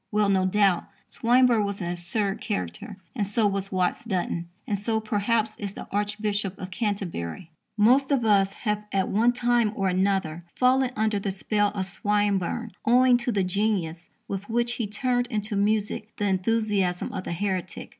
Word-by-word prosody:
Well, 210 -1 +2
no 190 -1 +3
doubt, 195 -2 +3 0.2
Swinburne 240 -2 +3
was 200 0 -3
an 175 -2 -2
absurd 195 +3 -2
character. 90 - -4 0.2
And 210 - 0
so 210 +2 +1
was 195 -1 -1
Watts 185 -2 0
Dunton. 175 -5 -2 0.2
And 205 - -1
so, 220 +2 -1
perhaps, 215 +1 0
is 200 -2 -5
the - - -8
Archbishop 205 -1 -1
of 185 0 -7
Canterbury. 180 - -3 0.3
Most 255 +7 +4
of 260 -5 +2
us 195 -2 +4
have, 210 -1 -2
at 190 -1 +1
one 230 +4 +3
time 240 -3 +2
or 195 -2 +1
another, 185 -3 0
fallen 260 0 +3
under 215 -1 +1
the 200 - -2
spell 205 +2 0
of 190 -2 -1
Swinburne 205 +3 0
owing 250 +2 +5
to 240 0 -2
the 200 -3 +1
genius 180 -3 -1 0.2
with 200 +2 -5
which 235 +1 +1
he 220 - -1
turned 245 +3 0
into 210 -2 -3
music 210 +1 0
the 205 - -1
enthusiasm 195 -2 0
of - - -4
the - - -4
heretic. 185 -1 -3
205 Hz, 170 wpm, -26 LUFS, 190-220 Hz, 0.3 s, owing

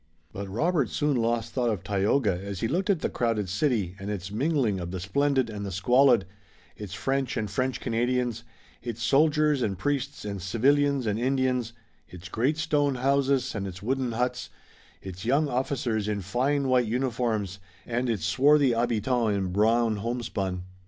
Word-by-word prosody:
But 100 0 -6
Robert 150 - +1
soon 145 -1 0
lost 115 -1 0
thought 125 -2 +1
of 105 -6 -2
Tayoga 105 +3 +1
as 100 -2 -5
he 115 - +1
looked 185 - -1
at 190 -5 +2
the - - +1
crowded 115 -4 0
city, 100 - 0
and 100 +1 -5
its 100 -2 -4
mingling 125 - +1
of 85 -1 -5
the 95 +1 -4
splendid 135 +6 +1
and 105 -2 -6
the 100 - -4
squalid, 125 +6 +4 0.5
its 100 -3 -7
French 135 +5 -1
and 110 - -1
French 130 +6 -1
Canadians, 120 0 -1 0.4
its 115 -1 -5
soldiers 150 0 +3
and 100 -5 -1
priests 140 +3 -2
and 100 -2 -4
civilians 140 +7 +2
and 105 0 0
Indians, 130 -2 0 0.4
its 90 +1 -10
great 135 +7 0
stone 145 -3 +1
houses, 135 0 +1
and 100 -2 -3
its 95 +1 -9
wooden 130 0 -1
huts, 125 +2 -2 0.5
its 95 0 -8
young 140 +6 +2
officers 125 -5 -1
in 105 -1 -1
fine 135 +8 0
white 125 -2 +3
uniforms 115 -5 -1 0.3
and 120 +1 -1
its 105 -8 -1
swarthy 140 +6 +4
habitants 115 -1 +1
in 95 -2 -1
brown 110 +3 +2
homespun. 100 -5 -3
120 Hz, 165 wpm, -27 LUFS, 105-135 Hz, 0.5 s, squalid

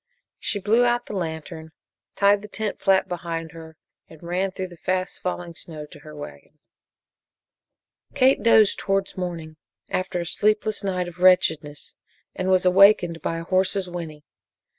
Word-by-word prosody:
She 205 - -1
blew 220 +5 +3
out 240 0 +1
the 210 - -7
lantern, 160 -2 -6 0.4
tied 200 0 +4
the 210 - -9
tent 210 0 -4
flap 190 -1 +3
behind 165 -3 -5
her, 160 -1 -12 0.3
and 160 +1 -15
ran 180 +3 -1
through 185 0 -6
the 175 - -14
fast 185 +2 -2
falling 175 -1 -4
snow 155 -2 -9
to 150 - -15
her 155 -1 -12
wagon. 75 - -11 1.6
Kate 260 +1 +4
dozed 220 -3 +4
towards 195 -1 -1
morning 170 -4 -5 0.3
after 185 -1 -2
a 170 - -3
sleepless 210 +4 0
night 180 -2 -1
of 175 0 -11
wretchedness 160 -5 +2 0.4
and 185 0 -3
was 185 -1 +3
awakened 180 -3 +5
by 165 - -2
a 165 - -5
horse's 185 +2 0
whinny. 165 -4 -7
180 Hz, 155 wpm, -23 LUFS, 165-195 Hz, 1.6 s, awakened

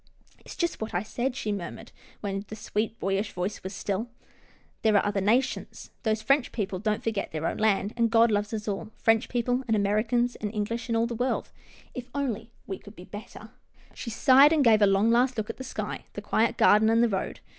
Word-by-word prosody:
" - - -31
It's - - -10
just 340 -7 -2
what 220 -4 -4
I 175 - 0
said," 245 +4 -2
she 215 -5 -2
murmured, 195 -4 -6 0.3
when 195 -1 -3
the 215 - -7
sweet, 215 +1 -3
boyish 195 +2 -1
voice 185 +3 -3
was 190 +2 -6
still. 205 +4 -3 0.4
" - - -33
There're 215 -2 +3
other 205 -1 0
nations. 235 +7 0
Those 215 -2 0
French 275 +3 +2
people 195 -4 -3
don't 215 +3 -1
forget 220 -3 -2
their 155 0 -3
own - - -1
land, 210 -1 +1
and 230 -1 +2
God 230 0 +5
loves 205 0 0
us 215 -1 -4
all 205 +1 -3
— - - -36
French 225 +1 +3
people, 245 +1 0
and 225 - +2
Americans, 220 +4 +1
and 210 -1 -4
English, 230 +4 -2
and 230 - +1
all 230 - +2
the 235 - -4
world 245 +3 -1 0.2
— - - -25
If 250 -1 -7
only 235 -5 -2
we 190 - -5
could 205 - -14
be 180 - -11
better! 205 +3 -10 0.2
" - - -28
She 235 - -6
sighed, 275 +7 +6
gave 220 -3 +5
a 205 - +7
long, 195 +3 +3
last 250 +1 +3
look 220 +1 -2
at - - -18
the 260 - -6
sky, - - -5
the - - -6
quiet 225 +1 +1
garden, 215 +1 +5
and 230 +1 +4
the - - +5
road. 195 -4 -3
220 Hz, 230 wpm, -27 LUFS, 205-235 Hz, 0.4 s, a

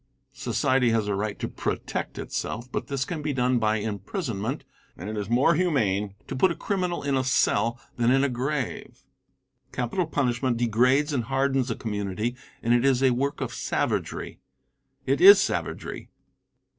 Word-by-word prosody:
Society 130 -2 +1
has 115 -2 +1
a 105 - 0
right 105 +1 -2
to - - -3
protect - - -4
itself, 120 +2 -4
but - - -3
this 135 -1 -2
can 165 -3 -4
be 150 -1 -2
done 125 -1 +2
by 110 -1 +2
imprisonment, 110 - -3 0.3
and 95 +5 -6
it - - -5
is 105 -1 -4
more 120 +3 +4
humane 105 - 0
to - - -5
put 185 +9 +4
a 170 - -2
criminal 180 -5 -2
in 140 -1 0
a 130 - +1
cell 120 -2 +2 0.2
than 120 -1 +2
in 135 +2 +4
a - - +3
grave. 130 +1 -3 0.7
Capital 125 +8 -1
punishment 125 -4 0
degrades 125 +6 +2
and 125 -5 -1
hardens 135 0 +1
a 115 - -1
community 105 +2 -3 0.3
and 120 0 +3
it 120 0 +3
is 135 -1 +3
a 130 - +5
work 140 +4 -1
of - - -3
savagery. - - -2 0.7
It - - +1
is 400 +2 +10
savagery. - - -3
125 Hz, 170 wpm, -26 LUFS, 110-140 Hz, 0.7 s, is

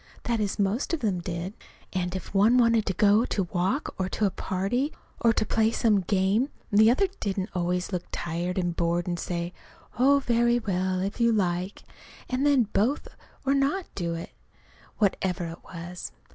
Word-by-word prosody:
That 235 -2 0
is, 205 -2 -1
most 205 - 0
of 320 - -9
them 200 -6 0
did. 175 +2 -4 0.4
And 180 -1 -1
if 190 - -6
one 210 +5 +5
wanted 230 -3 +4
to 190 - +1
go 210 +3 +4
to 200 - -1
walk, 190 +11 0
or 190 0 0
to 210 - 0
a 195 - +2
party, 200 +13 -1 0.3
or 230 - +4
to 215 - 0
play 220 0 +2
some 215 -3 +2
game, 195 +7 +1 0.2
the 215 +2 +6
other 260 +12 +4
didn't 195 0 -2
always 180 +1 -1
look 180 -2 -3
tired 175 +2 -3
and 175 -2 0
bored, 170 0 0
and 175 -1 -2
say, 175 0 -3 0.5
"Oh, 275 +3 +6
very 240 -2 +2
well, 185 -4 -1
if 200 +5 -3
you 235 0 +5
like." 185 -2 -1 0.4
And 265 +3 +1
then 280 -4 +5
both 245 +9 +1 0.4
not 275 +7 +1
do 170 -3 -2
it, 165 - -7 0.7
whatever 190 -3 0
it 165 - -10
was. 175 0 -7
195 Hz, 175 wpm, -27 LUFS, 180-235 Hz, 0.7 s, the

